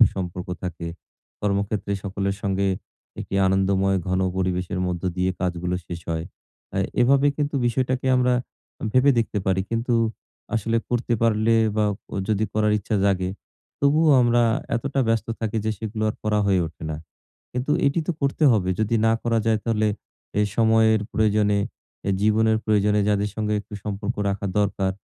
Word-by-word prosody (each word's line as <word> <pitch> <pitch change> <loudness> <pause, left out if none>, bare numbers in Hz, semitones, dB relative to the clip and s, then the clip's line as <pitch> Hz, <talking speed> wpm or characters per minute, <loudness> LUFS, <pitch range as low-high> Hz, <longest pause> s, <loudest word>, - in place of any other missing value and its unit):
সুসম্পর্ক 90 -5 +1
থাকে। 85 -2 -4 0.5
কর্মক্ষেত্রে 100 0 -1
সকলের 100 0 -2
সঙ্গে 100 -1 0 0.5
একটি - - -6
আনন্দময় 95 0 +2
ঘন 95 +1 +1 0.2
পরিবেশের 90 0 -1
মধ্য 90 -1 -3
দিয়ে 90 0 +1
কাজগুলো 90 0 -1
শেষ 85 -1 -6
হয়। 80 0 -2 0.5
অ্যা 95 - -1 0.2
এভাবে 135 +3 +4
কিন্তু 145 -1 -1
বিষয়টাকে 130 +2 0
আমর 125 0 +3 0.6
ভেবে 130 +3 +5
দেখতে 115 -2 0
পারি। 95 0 +2
কিন্তু 115 +1 0 0.6
আসলে 115 +1 0
করতে 120 0 0
পারলে 115 0 +3 0.2
বা 105 - +3 0.4
যদি 110 0 +1
করার 105 0 +2
ইচ্ছা 105 +2 -2
জাগে 95 -2 +1 0.5
তবুও 150 +3 +4
আমরা 120 0 +3 0.3
এতটা 135 +3 -1
ব্যস্ত 115 -1 +1
থাকি 110 0 -1
যে 110 - +1
সেগুলো 110 0 -4
আর - - -7
করা 105 0 +2
হয়ে 95 -2 +3
ওঠে 80 - -13
না। 75 - -3 0.6
কিন্তু 125 +3 -2 0.2
এটি 140 +4 +2
তো 175 - +1
করতে 140 +2 +1
হবে। 95 -5 +1
যদি 110 +1 +1
না 115 - +4
করা 115 -1 +1
যায় 110 -1 +3
তাহলে, 110 -2 +1 0.5
এই 105 - +3
সময়ের 110 -1 +4
প্রয়োজনে, 105 -1 +2 0.6
জীবনের 110 +1 +3
প্রয়োজনে 105 -1 +2
যাদের 105 0 +1
সঙ্গে 105 -1 -1
একটু 105 - -12
সম্পর্ক 105 +2 -3
রাখা 100 +1 -2
দরকার, 100 -2 +1
105 Hz, 155 wpm, -24 LUFS, 95-115 Hz, 0.6 s, ভেবে